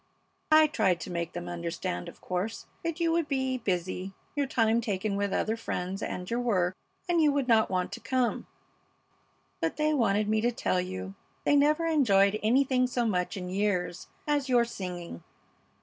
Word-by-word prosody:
I 310 0 +8
tried 205 - +1
to - - -6
make 170 -1 -3
them 175 0 -5
understand, 170 - -4
of - - -15
course, 185 +5 -3 0.2
that 335 0 -3
you 335 -1 +2
would 330 -2 +1
be 265 -2 -1
busy, 185 -2 -2 0.2
your 285 -1 0
time 230 -2 +2
taken 205 -2 -1
with 200 0 -1
other 220 +3 0
friends 190 -4 -4
and 180 0 -4
your 235 +4 -1
work, 185 -7 +1 0.3
and 345 -2 +3
you 300 -2 +5
would 280 -2 0
not 225 -2 +4
want 185 -1 -1
to - - -6
come; 255 -2 -1 1.1
but - - -1
they 305 0 +2
wanted 215 -6 +2
me 215 0 +2
to 240 +2 +2
tell 185 -5 0
you 95 - -5 0.3
they 290 - +3
never 300 +3 +3
enjoyed 215 -10 +4
anything 255 +2 +3
so 245 -1 0
much 190 -1 -1
in 180 -1 -5
years 185 -2 -1 0.2
as 290 -2 0
your 240 -2 +4
singing. 180 - -6
220 Hz, 180 wpm, -29 LUFS, 180-265 Hz, 1.1 s, I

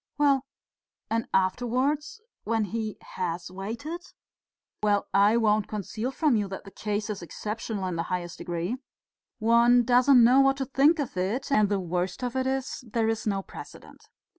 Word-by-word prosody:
"Well, 280 -2 +3 0.7
and 230 0 0
afterwards, 255 - 0 0.2
when 225 0 0
he 215 0 -3
has 175 0 -4
waited?" 235 - -5 0.8
"Well, 205 -1 +2
I 205 +3 +5
won't 215 -2 +2
conceal 215 +3 -4
from 270 0 +2
you 205 -2 0
that 190 0 -7
the 195 - -12
case 210 +1 -3
is 200 - -6
exceptional 210 +4 -4
in 180 -2 -3
the - - 0
highest 175 -2 -3
degree. 175 +7 -3 0.6
One 235 +2 +5
doesn't 250 +1 +6
know 250 +3 +6
what 270 0 +3
to 270 - -2
think 280 +5 +4
of 285 -9 -3
it, 205 +10 -2
and 215 -6 +4
the 200 -1 +1
worst 180 +3 -2
of 245 0 -3
it 260 0 0
is 265 -1 -2
there 225 0 +1
is 225 0 -2
no 195 -2 0
precedent. - - -12
225 Hz, 165 wpm, -27 LUFS, 195-255 Hz, 0.8 s, doesn't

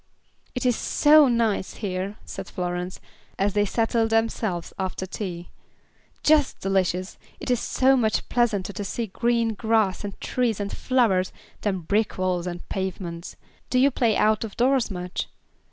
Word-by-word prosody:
"It 250 - -2
is 245 -2 +4
so 300 +3 +5
nice 230 -5 0
here," 195 0 -3
said - - -7
Florence, 180 0 -4 0.4
as 200 0 +1
they 205 0 +3
settled 225 +2 +1
themselves 225 -5 0
after 190 0 -2
their 185 - -17
tea, 175 -4 -5 0.7
"just 300 -2 +3
delicious. 185 -1 0 0.2
It - - -3
is 245 - +2
so 265 +2 +3
much 220 -4 +1
pleasanter 205 -5 +1
to 205 - -4
see 230 +4 -3
green 230 +2 +1
grass, 220 -3 +1
and 200 -1 -6
trees, 240 -5 0
and 200 -1 -3
flowers, 220 -8 +2 0.3
than 190 -3 -1
brick 205 +6 0
walls, 185 -1 0
and 175 0 -6
pavements. 180 -3 -4 0.3
Do 255 - +1
you 275 +2 +5
play 230 -4 +2
out 215 +1 +3
of 220 -3 -7
doors 255 0 +3
much?" 180 -1 -4
205 Hz, 155 wpm, -25 LUFS, 185-235 Hz, 0.7 s, so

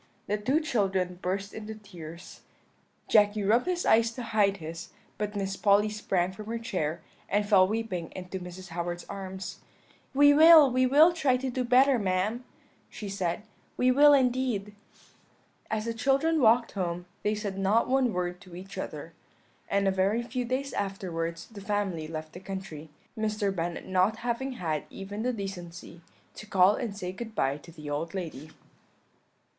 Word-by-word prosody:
The 205 - 0
two 265 +9 +2
children 190 - -1
burst 195 +2 -3
into 220 0 -7
tears; 175 -5 -11 0.7
Jacky 210 -1 +4
rubbed 230 - +3
his 360 -1 -1
eyes 230 +1 +4
to 245 - -6
hide 210 -3 +2
his; 165 +1 -7 0.3
but 210 0 -3
Miss 195 -1 -2
Polly 205 +1 +3
sprang 190 -4 -1
from 210 +2 -10
her 230 +1 -2
chair, 170 -8 -3 0.3
and 205 +1 +1
fell 190 -3 +6
weeping 200 -6 -3
into 185 +1 -6
Mrs. 180 +1 -9
Howard's 175 +1 -4
arms. 190 -1 -7 0.6
"'We 290 +1 +7
will, 310 -2 +8
we 255 +1 +3
will 305 +6 +6
try 280 -7 +2
to 260 0 -3
do 255 +1 -1
better, 255 +1 +4
ma'am,' 200 +5 -1 0.5
she 210 - -7
said; 190 -1 -2 0.3
'we 255 0 +4
will 290 +3 +7
indeed.' 250 -6 +1 1.0
"As 215 0 -2
the 230 - -2
children 275 +7 +2
walked 235 0 +4
home 175 -2 -3 0.2
they 210 +1 0
said 200 -2 -4
not 205 +4 +2
one 260 -2 +2
word 180 -1 -3
to 180 -1 -13
each 190 +2 -8
other; - - -6 0.6
and 200 0 +2
a - - +4
very 195 +5 +1
few 250 +1 -3
days 260 +3 -2
afterwards 170 -4 -3
the 210 -3 -11
family 195 -6 -2
left 155 -1 -7
the 180 - -8
country, 190 -5 -7 0.3
Mr. 215 -2 -1
Bennet 170 0 -3
not 190 +4 +2
having 255 +3 -1
had 160 - -3
even 200 +2 -7
the 250 +2 0
decency 180 -5 -7 0.3
to 215 - -10
call 190 0 +5
and 215 -3 -4
say 180 -3 -4
good 220 +3 -8
bye 135 +1 +1
to 170 +3 -14
the 155 -2 -11
old 155 +5 -3
lady. 155 -5 -6
200 Hz, 170 wpm, -28 LUFS, 180-235 Hz, 1.0 s, will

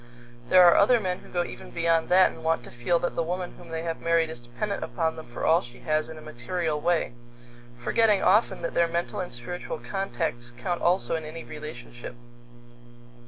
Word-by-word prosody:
There 185 -1 +8
are 175 - +8
other 235 +4 +5
men 185 -3 -2
who - - -15
go 175 -1 0
even - - -9
beyond 165 -1 +1
that 185 +1 +6
and - - -12
want 160 0 +1
to - - -10
feel 120 +9 +1
that 175 - -2
the - - +1
woman 180 +2 -3
whom - - -13
they 165 0 -3
have 165 -1 -3
married 165 -1 +2
is 120 - -7
dependent 120 - -4
upon 160 -3 -1
them 160 - -9
for 120 - -5
all 165 +2 +5
she 120 +1 -12
has 155 0 0
in 160 - -8
a - - -10
material 155 +3 -3
way, 170 -7 +1 0.6
forgetting 210 - +3
often 205 -3 +3
that 170 - -2
their 170 - +3
mental 170 +3 -2
and 180 - -4
spiritual 120 +9 -5
contacts 120 -10 -3
count 175 -3 -2
also 175 -1 +2
in 160 - -3
any 155 +2 -7
relationship. 125 -6 -9
165 Hz, 205 wpm, -27 LUFS, 155-180 Hz, 0.6 s, There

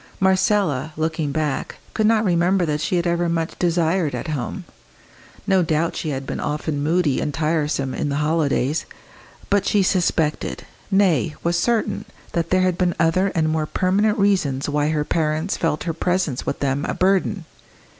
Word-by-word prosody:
Marcella, 190 - +2
looking 160 -2 -1
back, 150 -2 -2 0.2
could 215 -1 +2
not 225 -1 +3
remember 175 +1 +2
that 150 -1 -1
she 185 - 0
had 175 0 +1
ever 170 0 +1
been 170 0 0
much 165 -1 -2
desired 170 -2 +1
at - - -5
home. 150 +6 -3 0.8
No 190 -2 +3
doubt 165 0 0
she 155 - -3
had 135 -2 -3
been - - -4
often 150 0 -2
moody 155 -2 +1
and 150 - -1
tiresome 150 -2 -1
in 145 - -2
the 140 - -1
holidays; 150 -1 0 0.6
but 200 -1 +3
she 205 -2 +2
suspected 170 -4 0 0.2
nay, 180 - +2
was 170 +1 +1
certain 215 +3 0 0.3
that 170 -1 -1
there 185 0 +3
had 185 -1 +1
been 180 -2 +1
other 165 +4 +3
and 160 -2 +2
more 155 -1 0
permanent 200 +5 +1
reasons 185 -10 +1
why 145 0 +1
her 150 -1 0
parents 155 +3 0
felt 160 -2 -1
her 165 - -2
presence 175 -5 -1
with - - -3
them 140 0 0
a - - -2
burden. 190 -1 +1
165 Hz, 175 wpm, -22 LUFS, 150-185 Hz, 0.8 s, not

